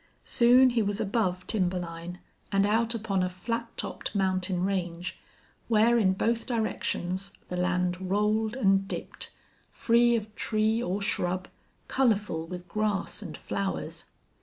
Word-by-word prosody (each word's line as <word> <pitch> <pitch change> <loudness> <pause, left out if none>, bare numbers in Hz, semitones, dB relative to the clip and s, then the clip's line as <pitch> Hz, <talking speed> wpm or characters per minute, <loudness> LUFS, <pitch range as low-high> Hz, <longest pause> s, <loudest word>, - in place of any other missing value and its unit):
Soon 250 +2 +6
he 235 -1 +2
was 205 0 -1
above 195 -4 0
timber 185 -4 0
line 170 0 -6 0.3
and 195 0 +3
out 230 +3 +2
upon 205 -4 -1
a 185 - +1
flat 230 +6 -3
topped - - -4
mountain 185 -1 +1
range, 180 -2 -3 0.5
where 230 +1 +4
in 190 -4 +3
both 230 +4 0
directions 195 -5 -1 0.2
the 180 - -3
land 180 0 0
rolled 215 +3 +1
and 195 -5 +3
dipped, - - -6 0.4
free 235 0 +3
of 215 -1 -3
tree 220 +1 +1
or 200 -2 -1
shrub, 185 -1 -1 0.4
colorful 210 -10 +1
with 180 +1 -7
grass 210 +2 -1
and 170 -7 -7
flowers. 195 -1 -4
200 Hz, 135 wpm, -28 LUFS, 185-225 Hz, 0.5 s, Soon